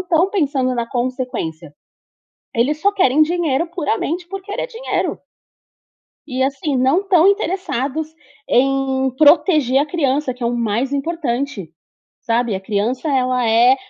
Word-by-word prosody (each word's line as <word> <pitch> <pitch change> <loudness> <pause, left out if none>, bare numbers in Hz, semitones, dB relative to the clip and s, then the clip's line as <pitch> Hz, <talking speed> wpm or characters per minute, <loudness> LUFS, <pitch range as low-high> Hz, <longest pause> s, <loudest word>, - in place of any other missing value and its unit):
estão 360 +1 +1
pensando 275 -8 0
na 235 -1 -2
consequência. 240 - -4 0.8
Eles 285 +7 +1
só 405 - +3
querem 310 -7 +3
dinheiro 330 -2 0
puramente 340 +1 -2
por 390 +2 -7
querer 405 +1 -4
dinheiro. - - -3 1.1
E, 260 -2 -2
assim, 275 +2 -1
não 265 +7 +3
estão 380 -4 +3
interessados 315 - -1 0.4
em 265 0 +1
proteger 300 -3 +4
a 290 - +1
criança, 285 -4 0
que 250 - -12
é 235 - +1
o 240 - -1
mais 235 +4 -1
importante, 275 - -3 0.5
sabe. 235 -2 0
A 190 - -3
criança 220 +9 -2
ela 255 -3 +1
é 240 +4 +5
270 Hz, 135 wpm, -19 LUFS, 250-330 Hz, 1.1 s, é